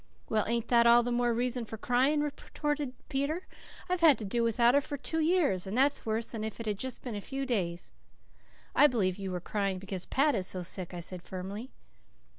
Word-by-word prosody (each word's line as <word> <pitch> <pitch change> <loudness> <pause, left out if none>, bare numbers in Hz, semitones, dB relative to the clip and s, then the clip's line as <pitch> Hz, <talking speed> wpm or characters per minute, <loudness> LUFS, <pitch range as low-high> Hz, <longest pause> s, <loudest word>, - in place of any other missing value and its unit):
"Well, 215 -1 +1
ain't 235 0 -1
that 235 -1 +5
all 240 +1 +7
the 245 - -2
more 240 0 +2
reason 245 +1 0
for 225 0 -7
crying?" 260 +6 +2
retorted 295 -1 -3
Peter. 290 +7 -2 0.4
"I've 365 -1 -1
had 310 -7 +7
to 215 - -5
do 235 +5 0
without 235 +1 +4
her 285 - +4
for 285 +1 -5
two 320 +4 -2
years, 310 - +2
and 205 +5 -3
that's 275 -2 +2
worse 220 +1 -1
than 220 -2 -4
if 220 0 -5
it 230 - -5
had 210 -2 -2
just 260 -2 -5
been 245 - -5
a 205 - -4
few 270 +5 -4
days." 180 -9 -2 0.8
"I 295 - +8
believe 200 -7 0
you 195 -1 -4
were 180 -1 -3
crying 195 +1 -2
because 190 -1 -5
Pat 290 +2 +3
is 185 -5 -1
so 185 -1 -3
sick," 180 0 -2
I 175 - -5
said 180 +1 -6
firmly. 195 +7 -6
235 Hz, 220 wpm, -30 LUFS, 195-270 Hz, 0.8 s, I